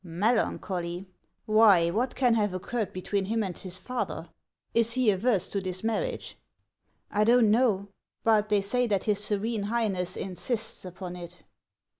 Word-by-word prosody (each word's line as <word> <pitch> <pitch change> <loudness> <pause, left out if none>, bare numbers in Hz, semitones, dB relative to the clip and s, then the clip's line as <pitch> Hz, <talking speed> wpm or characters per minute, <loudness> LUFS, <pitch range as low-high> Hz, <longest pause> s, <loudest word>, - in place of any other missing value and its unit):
" - - -43
Melancholy! 180 -2 -1 0.4
Why, 210 -6 +5
what 240 +7 -1
can 250 -3 +3
have 205 -4 +1
occurred 215 +4 -3
between 190 +2 -2
him 225 +2 0
and 185 -3 -4
his 185 -1 -3
father? 250 +5 -4 0.4
Is 230 0 +3
he 255 -4 +3
averse 195 -1 +1
to 200 - -2
this 185 0 -4
marriage? 460 - -2 0.2
" - - -53
" - - -39
I 210 - +2
do 235 +3 +5
not 225 -3 +4
know. 215 -4 +2 0.4
But 215 -2 +3
they 205 -1 +3
say 245 +5 0
that 200 -3 0
his 210 -1 +1
Serene 215 +1 -1
High 225 +2 0
ness 180 -2 -3
insists 195 +4 -3
upon 180 0 -7
it." 175 -1 -10
210 Hz, 175 wpm, -28 LUFS, 185-230 Hz, 0.4 s, Why